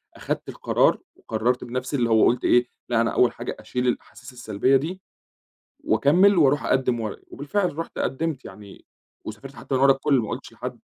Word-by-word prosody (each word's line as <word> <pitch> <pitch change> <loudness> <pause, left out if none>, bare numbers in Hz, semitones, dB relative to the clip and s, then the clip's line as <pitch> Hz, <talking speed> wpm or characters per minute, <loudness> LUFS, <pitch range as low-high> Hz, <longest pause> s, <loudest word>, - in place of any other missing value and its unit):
أخدت - - -4
القرار، - - +2 0.2
وقرّرت 115 +3 -1
بنَفْسي، 125 +3 -4
اللي 120 -4 +1
هو 110 -1 +5
قُلت 125 +1 +1
إيه: 125 0 +4 0.2
"لا 120 -1 +2
أنا 115 - 0
أول 125 - +3
حاجة - - -6
أشِيل 125 0 -3
الأحاسيس 130 +1 -4
السلبية 120 +2 +1
دي، 165 +8 -1 0.8
وأكمّل، 175 - +4
وأرُوح 145 -2 +3
أقدِّم 125 -2 +1
ورقى." 110 -2 -5
وبالفعل 165 +3 -2
رُحت 165 - -5
قدّمت 150 -1 -2
يعني 100 -2 -12 0.4
وسافرت 130 +6 -9
حتى 135 - -4
من 130 - +1
ورا 140 - +7
الكل، 135 0 +2
ما 110 -3 -3
قُلتش - - -7
لحد. - - -7
130 Hz, 175 wpm, -24 LUFS, 120-145 Hz, 0.8 s, ورا